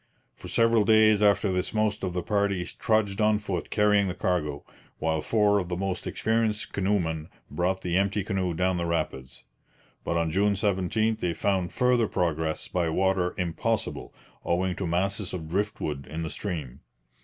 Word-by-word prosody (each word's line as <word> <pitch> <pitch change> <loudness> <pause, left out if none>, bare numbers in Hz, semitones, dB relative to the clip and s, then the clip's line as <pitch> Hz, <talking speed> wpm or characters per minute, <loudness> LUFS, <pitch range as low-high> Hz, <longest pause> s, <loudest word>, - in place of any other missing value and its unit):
For - - -11
several 115 -1 +3
days 110 0 +5
after 100 -1 +3
this 90 +3 -2
most 110 -1 0
of 90 -2 -2
the 90 -1 -2
party 100 -4 0
trudged 110 0 0
on 105 0 +4
foot 100 -4 -4
carrying 105 -1 +3
the 90 - -3
cargo, 75 -6 -1 0.3
while 80 -1 0
four 105 0 +3
of 90 -2 -4
the 90 - -2
most 95 -1 -3
experienced 110 -1 0
canoemen 90 -6 -1 0.2
brought 90 +5 -1
the 90 0 0
empty 100 +1 +1
canoe 95 -4 -1
down 90 +1 +1
the 85 -1 -1
rapids. 65 -7 -3 0.6
But 85 - -1
on 85 -1 0
June 100 +4 +2
17 105 +2 +1
they 85 -1 -1
found 95 -1 0
further 125 -3 +2
progress 80 -3 -1
by 85 -2 0
water 90 +1 +1
impossible 85 -3 -2 0.3
owing 90 +1 0
to 95 - -2
masses 95 +3 -1
of 80 -3 -6
driftwood 80 -6 -2
in 80 +1 -4
the 80 - -4
stream. 75 -10 -5
95 Hz, 165 wpm, -27 LUFS, 85-105 Hz, 0.6 s, days